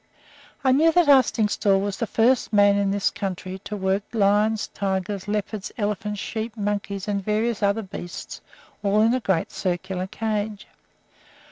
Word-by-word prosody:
I 260 - +4
knew 315 +5 +5
that 350 -2 +4
Arstingstall 215 -7 +4
was 200 0 -2
the 230 - -1
first 235 +5 +2
man 205 -1 +5
in 200 -1 +1
this 200 0 +1
country 190 -2 -5
to 210 - -4
work 190 +1 0
lions, 210 +1 +2
tigers, 195 0 -3
leopards, 210 -1 -3
elephants, 210 -1 -2
sheep, 220 +2 -4
monkeys, 200 -1 -3
and 200 -1 -1
various 215 +2 0
other 200 +2 +1
beasts 175 -2 -8 0.4
all 205 +1 +2
in 230 +2 +4
a 255 - +1
great 190 -8 0
circular 185 0 -3
cage. 215 0 -3
205 Hz, 150 wpm, -24 LUFS, 195-220 Hz, 0.4 s, knew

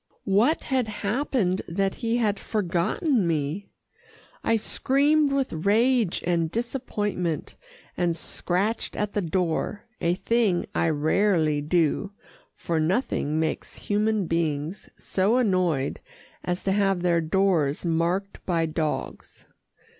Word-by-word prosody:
What 215 +10 +3
had 260 -5 0
happened, 210 -2 0
that 195 +3 0
he 230 0 +1
had 210 -4 +1
forgotten 205 - 0
me? 160 +4 -1 0.8
I 225 - +3
screamed 285 +6 +2
with 275 -1 0
rage 215 +5 +2
and 170 -2 +1
disappointment, 210 - -2 0.4
and 170 -2 0
scratched 190 +7 -1
at 210 -1 -2
the 205 - 0
door, 180 +3 -1 0.2
a 170 +1 +2
thing 210 -3 +1
I 165 - +2
rarely 155 0 +2
do, 170 +5 +1 0.4
for 165 -2 -2
nothing 155 - 0
makes 160 -1 -2
human 210 -1 0
beings 160 +1 -2
so 200 +6 +1
annoyed 180 - +1 0.4
as 180 +1 -2
to 195 - +1
have 195 -2 +1
their 170 -2 +3
doors 165 -3 +1
marked 170 +4 -1
by 170 -3 +1
dogs. 155 -1 -4
190 Hz, 115 wpm, -25 LUFS, 165-215 Hz, 0.8 s, What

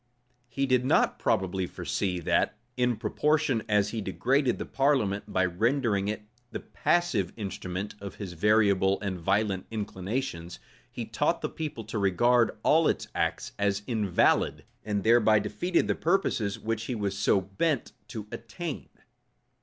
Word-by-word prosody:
He 135 +2 -1
did 130 -2 +2
not 130 - +2
probably 95 0 0
foresee 90 0 -2
that, 105 - +1 0.2
in 125 -2 +1
proportion 150 0 +1
as 105 -1 +3
he 110 0 -3
degraded 125 +6 +1
the - - -4
parliament, 130 -8 0
by 95 0 +2
rendering 105 +2 +1
it 105 0 -3 0.3
the - - -5
passive 140 - 0
instrument 95 -1 -4
of 100 -2 -7
his 95 -4 -7
variable 100 0 +3
and 95 -3 -3
violent 95 +2 0
inclinations, 100 -4 -4 0.3
he - - -5
taught - - 0
the - - -2
people 150 -8 -5
to 110 0 -4
regard 115 +5 +3
all 160 +1 +4
its - - -1
acts - - -1
as 100 0 0
invalid, 105 -7 +1 0.2
and 105 -2 -2
thereby 110 -1 +5
defeated 175 - -3
even - - -6
the - - +4
purposes 160 - +1
which 115 0 -3
he 125 - -3
was 100 -3 -2
so 100 0 +3
bent 100 - -1 0.2
to 110 -2 -6
attain. 150 +7 -6
105 Hz, 150 wpm, -28 LUFS, 100-125 Hz, 0.3 s, thereby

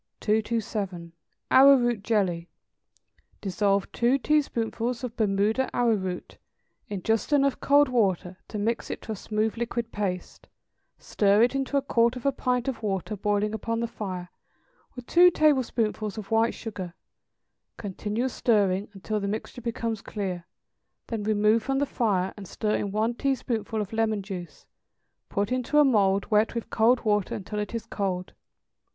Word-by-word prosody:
227. 210 -5 -1 0.4
=Arrowroot 255 -5 +6
Jelly.= 185 -6 0 0.9
Dissolve 200 0 0
two 245 +3 +2
teaspoonfuls 245 -4 0
of 245 -2 -4
Bermuda 215 +4 +1
arrowroot 200 -7 -1 0.5
in 200 -3 -5
just 225 +4 0
enough 280 -2 +3
cold 285 +1 +5
water 195 -7 0
to 215 - -6
mix 225 +3 -1
it - - -4
to - - -6
a - - -2
smooth 215 +2 -2
liquid 235 0 -3
paste, 190 -3 -4 0.5
stir 205 +1 +3
it 245 - +3
into 275 +1 0
a 275 - +1
quarter 235 -2 +2
of 250 - -10
a 275 - +4
pint 250 -2 -1
of 265 -4 -3
water 205 0 -2
boiling 205 +1 0
upon 230 +1 -2
the 235 - 0
fire, 185 -6 -6 0.7
with 250 -1 -8
two 355 +5 +6
tablespoonfuls 235 - +1
of 215 0 -7
white 225 +1 +2
sugar; 190 -6 -6 0.8
continue 210 +4 -3
stirring 205 -6 +1
until 210 +2 -3
the 200 - -3
mixture 220 +4 -5
becomes 230 -2 -3
clear, 185 -4 -4 0.6
then 225 -3 -2
remove 210 +1 +3
from 270 +4 -1
the 285 - +2
fire 200 -8 0
and 200 -3 -9
stir 215 +3 -2
in 200 - -2
one 220 +3 0
teaspoonful 240 -4 -2
of 210 0 -4
lemon 220 -2 0
juice, 185 -3 -8 0.6
put 200 +2 -1
into 255 +3 0
a 295 - +7
mould 200 -6 +3
wet 215 +2 +3
with 235 - -4
cold 235 +3 +4
water 210 -3 +1
until 210 +2 -5
it 210 +2 -4
is 230 - -4
cold. 185 -3 -3
220 Hz, 155 wpm, -26 LUFS, 200-240 Hz, 0.9 s, a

